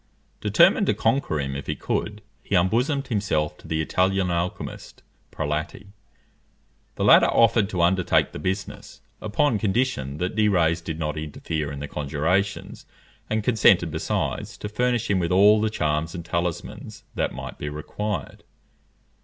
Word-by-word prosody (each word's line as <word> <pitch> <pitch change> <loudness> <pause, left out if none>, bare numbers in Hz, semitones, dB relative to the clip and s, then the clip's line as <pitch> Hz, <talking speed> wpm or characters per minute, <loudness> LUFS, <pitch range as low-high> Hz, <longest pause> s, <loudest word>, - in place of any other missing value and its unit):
Determined - - +4
to - - +2
conquer 115 - 0
him 70 -1 -3
if 70 - -6
he - - -1
could, 105 0 -3 0.2
he 100 - -2
unbosomed 125 - +1
himself 100 -9 0
to - - -14
the 80 0 -1
Italian 95 +2 +1
alchymist, 85 +1 -4 0.3
Prelati. 75 +6 -4 1.1
The - - -2
latter - - +7
offered 115 -3 +3
to 90 -4 0
undertake 90 +1 +2
the - - -7
business, 95 +5 -5 0.2
upon 110 +2 +1
condition 95 - -1
that 90 +4 -3
De 110 -1 +3
Rays 85 -4 +2
did 80 -1 -5
not 75 -1 -3
interfere 75 0 -4
in 70 0 -7
the 75 - -4
conjurations, 80 +8 -2 0.4
and 110 0 0
consented 95 -8 +4
besides 80 - -3
to 105 - -6
furnish 120 +1 0
him 100 -2 +1
with 85 -1 -1
all 105 +3 +6
the 110 - +1
charms 80 -3 -1
and 85 -2 -6
talismans 85 0 -4
that - - -1
might - - -8
be 75 - -4
required. 80 +3 -5
90 Hz, 155 wpm, -24 LUFS, 80-105 Hz, 1.1 s, latter